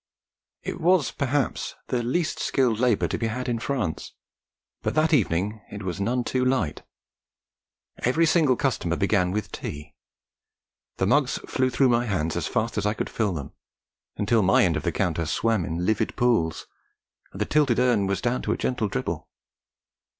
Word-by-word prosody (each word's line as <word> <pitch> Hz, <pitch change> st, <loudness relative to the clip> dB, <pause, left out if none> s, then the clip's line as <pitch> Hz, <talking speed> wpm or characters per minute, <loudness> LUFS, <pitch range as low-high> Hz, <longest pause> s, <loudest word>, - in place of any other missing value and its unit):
It -, -, -5 dB
was, 175 Hz, -2 st, +3 dB
perhaps, 140 Hz, -2 st, -1 dB
the 125 Hz, -, 0 dB
least 145 Hz, +8 st, -1 dB
skilled 125 Hz, -5 st, +1 dB
labour 115 Hz, -8 st, +2 dB
to -, -, -3 dB
be 115 Hz, -, 0 dB
had 125 Hz, +3 st, -3 dB
in 120 Hz, -2 st, -1 dB
France, 115 Hz, -, -3 dB, 0.7 s
but -, -, -2 dB
that 155 Hz, +1 st, +3 dB
evening 105 Hz, -, +1 dB
it 105 Hz, 0 st, -7 dB
was 95 Hz, +1 st, -3 dB
none 120 Hz, +4 st, 0 dB
too 130 Hz, +1 st, 0 dB
light. 125 Hz, -, 0 dB, 1.2 s
Every 160 Hz, +7 st, +2 dB
single 155 Hz, -5 st, +4 dB
customer 115 Hz, -11 st, 0 dB
began 100 Hz, -2 st, +2 dB
with 105 Hz, +2 st, -3 dB
tea: 75 Hz, +1 st, -7 dB, 1.0 s
the -, -, +1 dB
mugs -, -, +2 dB
flew 130 Hz, 0 st, +1 dB
through 130 Hz, +1 st, +3 dB
my 120 Hz, 0 st, +2 dB
hands 85 Hz, -6 st, -1 dB
as -, -, -1 dB
fast 110 Hz, 0 st, -1 dB
as 105 Hz, -, 0 dB
I 105 Hz, -, 0 dB
could -, -, -4 dB
fill 105 Hz, -4 st, 0 dB
them, 75 Hz, -5 st, -6 dB, 0.7 s
until 110 Hz, +2 st, +2 dB
my 95 Hz, 0 st, +4 dB
end 85 Hz, -3 st, +1 dB
of 75 Hz, -, -1 dB
the -, -, -1 dB
counter 85 Hz, -2 st, -1 dB
swam 110 Hz, +4 st, +1 dB
in 85 Hz, +2 st, -3 dB
livid 110 Hz, +3 st, 0 dB
pools, 115 Hz, -10 st, +1 dB, 0.7 s
and -, -, -10 dB
the -, -, +1 dB
tilted 145 Hz, -6 st, +2 dB
urn 120 Hz, -5 st, +3 dB
was 100 Hz, 0 st, -1 dB
down 120 Hz, +1 st, 0 dB
to -, -, -2 dB
a -, -, -3 dB
gentle 120 Hz, -4 st, -1 dB
dribble. 65 Hz, -, -4 dB
115 Hz, 175 wpm, -25 LUFS, 95-125 Hz, 1.2 s, single